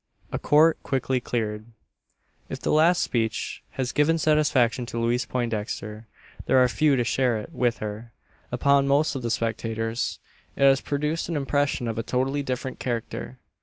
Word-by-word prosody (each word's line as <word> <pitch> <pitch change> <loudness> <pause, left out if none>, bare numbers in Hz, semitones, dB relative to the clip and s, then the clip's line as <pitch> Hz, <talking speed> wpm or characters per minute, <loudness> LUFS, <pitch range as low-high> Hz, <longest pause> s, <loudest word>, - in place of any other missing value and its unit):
A - - -2
COURT 155 +2 +4
QUICKLY 130 -1 -1
CLEARED. 110 -3 -3 0.8
If - - -5
the - - -1
last 165 +4 +4
speech 115 -2 -2 0.2
has 130 -1 -1
given 155 +3 +2
satisfaction 145 -6 +2
to 115 - -4
Louise 120 +2 +1
Poindexter, 110 -2 -4 0.4
there 130 - +4
are 125 -1 +6
few 145 +3 +2
who 125 - +1
share 125 0 +1
it 105 - -7
with 120 -4 +1
her. 110 +2 -6 0.4
Upon 140 0 +3
most 140 +2 +2
of 135 - -4
the 120 - -2
spectators 115 +1 -2 0.4
it - - 0
has 135 -1 +5
produced 150 +4 -2
an 170 - -2
impression 145 -3 0
of 115 -1 -3
a - - +1
totally 130 +5 -1
different 130 -1 -4
character. 120 -3 -4
125 Hz, 165 wpm, -25 LUFS, 115-140 Hz, 0.8 s, are